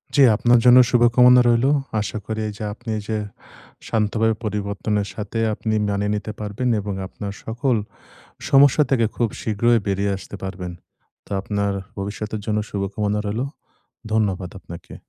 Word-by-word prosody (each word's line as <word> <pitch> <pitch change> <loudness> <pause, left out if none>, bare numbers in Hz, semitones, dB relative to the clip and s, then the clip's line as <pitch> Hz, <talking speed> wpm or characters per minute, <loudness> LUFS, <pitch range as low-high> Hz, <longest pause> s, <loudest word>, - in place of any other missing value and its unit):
জি, 145 - +5
আপনার 120 +2 +4
জন্য 125 0 +8
শুভকামনা 125 0 +6
রইলো। 120 +4 +3 0.3
আশা 105 +1 -4
করি 110 0 -3
এইযে 105 +1 -8
আপনি 120 +1 -10
এইযে 110 +1 -3 0.7
শান্তভাবে 110 0 +1
পরিবর্তনের 105 0 -2
সাথে 105 +1 -5 0.2
আপনি 110 +1 -2 0.2
মানিয়ে 100 +1 -1
নিতে 105 +1 -4
পারবেন। 105 +4 -2
এবং 100 0 -4
আপনার 100 +1 -7
সকল 120 +3 0 0.7
সমস্যা 140 +2 +6
থেকে 115 -4 +3
খুব 120 - +1
শীঘ্রই 115 +2 +2
বেরিয়ে 100 +1 0
আসতে 100 - -10
পারবেন। 90 -2 -5 0.5
তো - - -19
আপনার 100 0 -1 0.2
ভবিষ্যতের 105 +2 -4
জন্য 105 -1 0
শুভকামনা 105 +1 -2
রইলো। 110 +6 -2 0.7
ধন্যবাদ 100 -5 0
আপনাকে। 85 -2 -11
105 Hz, 140 wpm, -22 LUFS, 100-120 Hz, 0.7 s, জন্য